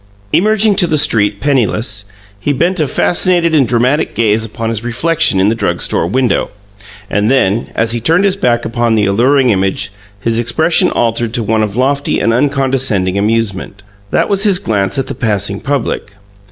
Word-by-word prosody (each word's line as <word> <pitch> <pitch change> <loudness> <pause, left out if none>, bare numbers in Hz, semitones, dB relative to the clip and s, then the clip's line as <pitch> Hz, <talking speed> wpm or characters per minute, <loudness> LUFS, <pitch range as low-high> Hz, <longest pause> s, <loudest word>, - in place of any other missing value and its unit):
Emerging 215 +5 +3
to 175 - +2
the 155 -2 +1
street, 105 -7 +2
penniless, 110 -5 -1 0.3
he 145 - -1
bent 175 +6 0
a 155 - +1
fascinated 175 +3 +1
and 140 -5 +3
dramatic 125 +6 0
gaze 110 -1 +1
upon 115 +1 -4
his 115 -1 -3
reflection 150 - +1
in 95 - +3
the - - +1
drug 85 -6 -2
store - - 0
window, 125 +6 0 0.6
and 105 +2 0
then, 115 -4 +1
as 115 +1 +1
he 120 - -2
turned 165 - +2
his 195 -1 +2
back 120 -10 0
upon 115 0 0
the 105 -2 +2
alluring 125 +6 +2
image, 95 0 -1 0.3
his 115 +2 -1
expression 160 +9 +1
altered 115 0 -1
to 120 - 0
one 110 +1 0
of 105 0 -3
lofty 140 +2 0
and 115 - +1
uncondescending 130 -8 0
amusement. 105 -1 -2 0.3
That - - +1
was 200 -1 +1
his 200 -4 +4
glance 100 - -1
at 135 - -1
the - - -5
passing 100 -3 -2
public. 130 -7 -3
115 Hz, 180 wpm, -13 LUFS, 105-145 Hz, 0.6 s, his